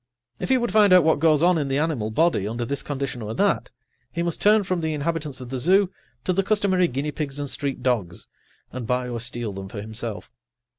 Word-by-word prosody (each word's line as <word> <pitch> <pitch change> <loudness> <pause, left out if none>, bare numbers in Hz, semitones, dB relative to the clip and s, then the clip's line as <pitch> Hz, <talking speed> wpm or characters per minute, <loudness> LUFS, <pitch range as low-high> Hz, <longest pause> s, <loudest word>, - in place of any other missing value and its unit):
If - - -3
he 260 - +5
would 240 -1 -1
find 210 -2 +5
out 180 -2 +7
what 160 -2 +3
goes 155 -1 +4
on 175 -1 +4
in 145 - -1
the 135 0 0
animal 145 -8 0
body 110 - +2
under 120 +2 -3
this 140 +3 -2
condition 135 -4 -4
or 110 +1 -5
that, 205 0 +1 0.4
he 170 - -2
must 170 -2 -2
turn 210 0 +5
from 180 -2 -1
the 160 -1 -1
inhabitants 150 -2 -3
of 125 -2 -8
the 130 0 -3
zoo 185 +7 +3 0.3
to 185 - +1
the 195 - +2
customary 195 -3 +2
guinea 140 +3 -3
pigs 145 -2 -4
and 145 0 -3
street 135 -1 -3
dogs, 110 -9 -1 0.4
and 125 -3 -6
buy 125 +1 0
or 120 -1 -3
steal 120 -2 -3
them 95 0 -7
for 100 - -7
himself. 110 +1 -6
145 Hz, 230 wpm, -24 LUFS, 120-175 Hz, 0.4 s, out